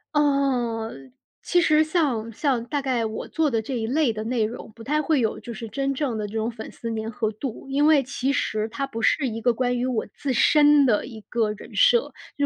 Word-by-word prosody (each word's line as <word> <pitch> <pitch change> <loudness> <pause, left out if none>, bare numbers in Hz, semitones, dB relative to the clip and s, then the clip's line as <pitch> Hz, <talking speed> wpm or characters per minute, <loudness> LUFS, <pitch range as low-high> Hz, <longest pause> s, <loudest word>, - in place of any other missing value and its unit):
呃， 265 -6 +1 0.5
其 355 - +2
实 310 -2 +4
像 285 -9 0
像 250 -1 0
大 285 +3 -2
概 255 -4 0
我 220 0 -5
做 320 -2 +1
的 225 -3 0
这 255 +4 -5
一 225 -1 -2
类 285 0 +2
的 215 -1 -5
内 235 -1 0
容， 220 +1 -5
不 230 +1 -12
太 300 +5 +1
会 300 -2 +1
有 220 -2 -1
就 235 - -8
是 225 0 -7
真 275 +5 -1
正 265 -4 -2
的 210 -1 -3
这 205 - -11
种 225 +1 -1
粉 220 -1 -8
丝 230 -1 -5
粘 220 0 -3
合 220 -1 -1
度。 230 +4 -6
因 280 +2 +2
为 305 -3 +5
其 270 +1 -2
实 215 -4 -1
它 275 +5 -3
不 230 -4 -6
是 265 +4 +2
一 225 0 -5
个 245 +1 +2
关 245 +1 0
于 245 - -1
我 250 -4 -1
自 275 -2 -2
身 295 +3 +5
的 220 -5 +2
一 225 -4 -10
个 220 0 -1
人 210 - -10
设， - - +4 0.2
就 285 - +2
245 Hz, 250 characters per minute, -24 LUFS, 225-285 Hz, 0.5 s, 为